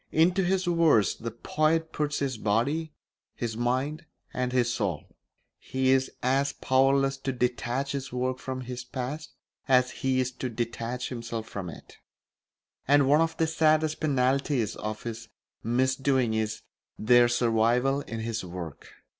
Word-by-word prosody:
Into 180 +4 +3
his 185 +1 +1
verse 165 - +4
the 115 - -6
poet 155 +7 0
puts 150 -1 -1
his 130 -5 -2
body, 140 +11 0 0.4
his 115 -3 -3
mind, 130 +7 -1 0.3
and 125 0 -1
his 120 -2 +2
soul; 100 -6 -2 0.6
he 130 0 0
is 130 0 +3
as 135 +2 +2
powerless 135 +1 +2
to 135 0 -3
detach 125 +2 -1
his 135 -1 -4
work 125 +1 -2
from 130 0 -5
his 125 0 -6
past 130 +5 -6 0.3
as 125 -2 +4
he 130 -1 0
is 130 0 0
to 130 0 -4
detach 120 +1 -3
himself 115 -2 -5
from 95 -3 -5
it; - - -13 0.9
and 140 0 +5
one 150 +3 +5
of 165 0 0
the 165 - +2
saddest 155 -1 +2
penalties 135 -4 +1
of 105 0 -5
his 115 -1 -6 0.3
misdoings 130 0 +1
is 110 0 -2 0.4
their 120 +2 +5
survival 120 +3 +2
in 115 -4 -6
his 115 -1 -3
work. 85 -4 -8
130 Hz, 145 wpm, -27 LUFS, 120-140 Hz, 0.9 s, and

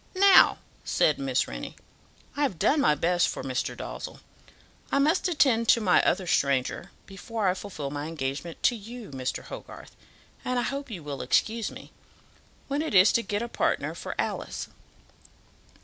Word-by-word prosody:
"Now," 390 0 +7 0.3
said 150 - +2
Miss 135 -2 0
Rennie, - - -7 0.6
"I 290 - -3
have 265 - 0
done 285 - +3
my 150 - +4
best 175 +3 +2
for - - -4
Mr. 130 -1 -3
Dalzell. - - -7 0.7
I - - +2
must 310 +7 +2
attend 260 -9 +2
to - - +6
my 190 -5 +4
other 185 +1 +1
stranger 140 -6 0 0.2
before 210 +1 -4
I 180 - +3
fulfil 180 -7 -6
my 145 +1 -4
engagement 145 +1 -5
to 245 - +4
you, 225 -2 -9
Mr. 130 -1 -4
Hogarth, - - -10 0.5
and 250 0 -1
I 245 - +1
hope 275 +2 -4
you 185 -8 -7
will 145 -2 -5
excuse 225 0 +1
me, - - -12 0.8
when 280 +2 -1
it 310 -9 -2
is 185 +2 +7
to 235 - +3
get 205 +1 -2
a - - -3
partner - - -1
for - - -6
Alice. - - -3
200 Hz, 165 wpm, -27 LUFS, 150-245 Hz, 0.8 s, Now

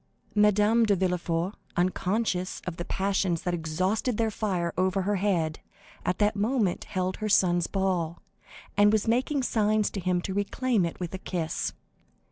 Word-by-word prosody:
Madame 210 +2 +4
de 210 -2 +3
Villefort, 180 0 -1 0.2
unconscious 185 +1 0
of 180 -3 -5
the 175 - -4
passions 190 -3 0
that 180 -2 -1
exhausted 185 +8 -1
their 225 -1 +1
fire 185 -6 -1
over 185 +1 +1
her 205 +1 0
head, 175 -5 0 0.4
at 180 - 0
that 210 0 +2
moment 210 -2 0
held 185 -1 -2
her 215 -1 -3
son's 175 -4 +3
ball, 180 -4 -1 0.6
and 205 0 +5
was 215 0 +1
making 260 +4 +1
signs 215 -3 +1
to 200 - -4
him 180 -1 +1
to 190 +2 -4
reclaim 205 +1 +1
it 165 - -8
with 175 -1 -4
a 190 - -4
kiss. 170 -4 -2
190 Hz, 160 wpm, -27 LUFS, 180-210 Hz, 0.6 s, and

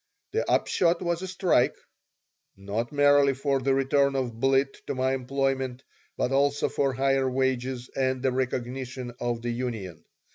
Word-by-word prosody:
The 455 - -1
upshot 170 0 +2
was 170 0 -1
a 190 - -4
strike 180 -8 +2 0.8
not 100 +4 -3
merely 145 -1 +4
for 135 0 0
the 135 +1 +1
return 140 +1 +2
of 120 -4 -2
Blitt 135 +1 +1
to - - -2
my 130 +1 +1
employment, 135 0 -1 0.3
but 125 - 0
also 140 +1 +2
for 140 -1 0
higher 135 0 +1
wages 130 -1 -1
and 130 -1 0
the 130 - +2
recognition 125 0 -3
of 120 -1 -2
the 120 - -1
union. 115 -8 -5
130 Hz, 150 wpm, -27 LUFS, 125-140 Hz, 0.8 s, merely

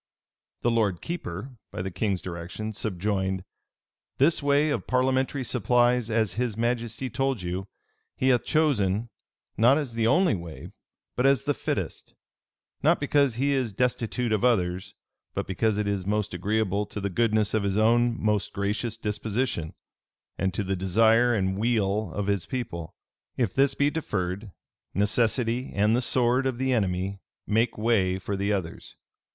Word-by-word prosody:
[] - - -63
The 120 - +3
lord 105 -6 +1
keeper, 130 - -6
by 90 - -5
the 95 - -4
king's 95 0 -1
direction, 90 +5 -5
subjoined, 95 -2 -1 0.7
"This 155 +5 +3
way 145 +2 +3
of - - -2
parliamentary 130 +1 +1
supplies 125 0 +2
as 110 -4 +1
his 115 0 -2
majesty 120 +1 -1
told 135 -3 -1
you, 90 +2 -3 0.5
he 130 - +1
hath 125 -2 +3
chosen, 115 -8 +1 0.5
not 120 +6 +5
as 140 -6 -3
the 115 -1 +1
only 175 +6 +4
way, 85 -4 -7 0.4
but 125 +2 +3
as 135 -5 +3
the - - +1
fittest; - - -4 0.7
not - - +4
because 140 -3 +2
he 140 +4 +1
is 130 -6 0
destitute 120 0 0
of 105 - 0
others, 95 -7 +1 0.4
but - - -1
because 105 +3 0
it 105 -1 -1
is 100 -2 -2
most 105 -1 0
agreeable 105 +2 0
to - - -6
the 100 -1 -2
goodness 110 0 +1
of 110 - +2
his 100 0 0
own 120 +2 +3
most 105 -2 0
gracious 105 +3 -2
disposition, 105 -5 -2 0.6
and 95 +1 0
to 105 - 0
the 95 0 -1
desire 115 +6 +4
and 95 -1 0
weal 105 -4 +1
of 105 - -2
his 100 -3 0
people. 85 -10 -5 0.4
If 115 -7 0
this 135 0 +3
be 145 +1 +2
deferred, 100 - -3 0.5
necessity 115 +4 +1
and 105 +3 +3
the 125 - +1
sword 125 +1 +2
of 130 -2 -2
the 130 0 +1
enemy 95 -2 -1 0.3
make 115 +3 +1
way 105 -5 +2
for 100 +2 -4
the 100 +2 0
others. 90 -5 -4
110 Hz, 160 wpm, -26 LUFS, 100-125 Hz, 0.7 s, not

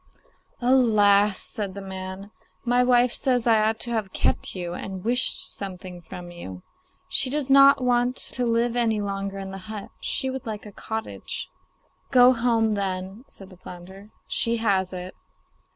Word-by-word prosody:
'Alas!' 210 -5 +4
said 200 -3 -4
the - - -5
man, 190 +1 -7 0.3
'my 245 +1 +3
wife 245 -1 +3
says 250 -3 0
I 225 -2 +4
ought 220 +1 +1
to 240 - -1
have 215 -5 -2
kept - - 0
you 175 -2 -4
and 190 0 -6
wished 245 +2 +2
something 185 -2 -8
from 175 +1 -9
you. 95 - -9 0.4
She 260 - +2
does 285 -1 -1
not 275 0 +7
want 245 0 +2
to 250 - -2
live 235 0 +1
any 225 -3 +2
longer 195 -1 -3
in 195 0 -6
the 195 - -7
hut; 210 -2 -7
she 265 -1 -2
would 265 -2 -6
like 215 -1 -5
a 210 - -9
cottage.' 220 +2 -5 0.6
'Go 250 -1 +7
home, 230 -2 +1
then,' 195 +3 -3
said 195 0 -12
the 185 - -14
flounder; 185 +3 -12 0.2
'she 235 0 +1
has 195 -5 +1
it. 180 0 -7
210 Hz, 165 wpm, -24 LUFS, 190-245 Hz, 0.6 s, not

